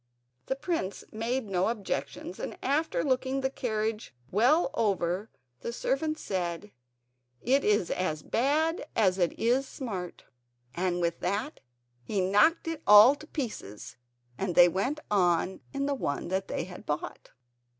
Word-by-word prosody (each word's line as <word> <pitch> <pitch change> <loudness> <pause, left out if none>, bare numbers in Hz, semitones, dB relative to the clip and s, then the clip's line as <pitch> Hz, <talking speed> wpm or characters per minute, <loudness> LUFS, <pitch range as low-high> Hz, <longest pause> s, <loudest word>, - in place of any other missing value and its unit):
The 265 - 0
prince 275 - -3
made 230 +2 -2
no 185 -1 +1
objections, 200 -4 -4
and - - -5
after 300 +4 +1
looking 260 0 0
the 265 0 0
carriage 220 - -3 0.2
well 265 - +3
over 195 -1 0 0.3
the 235 - -4
servant 310 +6 -1
said: 180 - -3 0.7
"It 270 +3 +2
is 205 -4 +2
as 155 -5 -2
bad 300 +6 +1
as 190 -3 +3
it 175 -2 +1
is 250 +4 +2
smart"; 195 -12 -6 0.5
and 180 0 -1
with 170 0 0
that 205 - -2 0.4
he 200 - -2
knocked 205 - +3
it 325 -2 -3
all 210 +5 +9
to 305 +2 -12
pieces, 130 - -6 0.4
and 185 -3 -2
they 175 - +9
went 200 - -1
on 180 -1 +2
in 275 0 -2
the 285 - 0
one 155 - -3
that 190 +1 -1
they - - -2
had 180 +1 -10
bought. 150 0 -4
210 Hz, 145 wpm, -29 LUFS, 185-270 Hz, 0.7 s, all